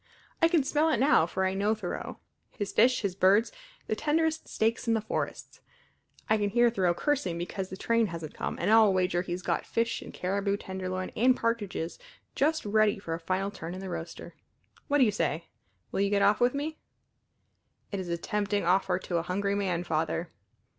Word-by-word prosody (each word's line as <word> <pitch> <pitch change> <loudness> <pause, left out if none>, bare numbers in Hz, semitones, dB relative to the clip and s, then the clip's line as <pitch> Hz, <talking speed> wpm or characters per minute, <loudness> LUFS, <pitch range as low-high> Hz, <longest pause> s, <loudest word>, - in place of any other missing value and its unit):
I 330 - +7
can 330 -4 +3
smell 300 +4 +2
it 310 - +2
now, 260 - +4
for 190 +2 -1
I 190 - 0
know 205 +3 +1
Thoreau 195 -5 -5 0.3
his 205 -3 -5
fish, 250 +3 +4
his 200 -3 -1
birds, 195 +4 +4 0.3
the 215 - -1
tenderest 320 +4 0
steaks 225 +2 0
in 230 - +3
the - - +2
forests! 215 - -4 0.7
I 220 0 +3
can 205 -1 +1
hear 240 +2 +4
Thoreau 185 -6 +1
cursing 225 - 0
because 185 +2 -4
the 190 - -7
train 230 +1 +2
hasn't 165 -4 -7
come, - - -4
and - - +1
I'll 220 -2 +7
wager 180 -2 +1
he's 180 0 -5
got - - 0
fish 230 0 -1
and - - -9
caribou 200 +2 -1
tenderloin 185 -1 -4
and 250 +3 +4
partridges 210 -8 -2 0.3
just 310 0 +1
ready 215 0 +3
for 170 -4 -5
a 165 - -3
final 185 +4 -1
turn 175 -3 -7
in - - -6
the 190 -1 -6
roaster. 165 -1 -7 0.5
What 290 - +2
do 275 - +6
you 220 - +3
say? 165 -5 -2 0.4
Will - - 0
you 200 - +2
get 200 0 +2
off 200 +1 +4
with 245 +2 +3
me?" 310 +3 -3 1.1
"It 200 - -2
is 180 -2 -5
a 170 - -1
tempting 205 +2 -1
offer 185 +3 +2
to 175 - -3
a - - +1
hungry 200 +4 -1
man, 185 -4 -1
Father." 165 +1 -1
200 Hz, 200 wpm, -29 LUFS, 185-230 Hz, 1.1 s, I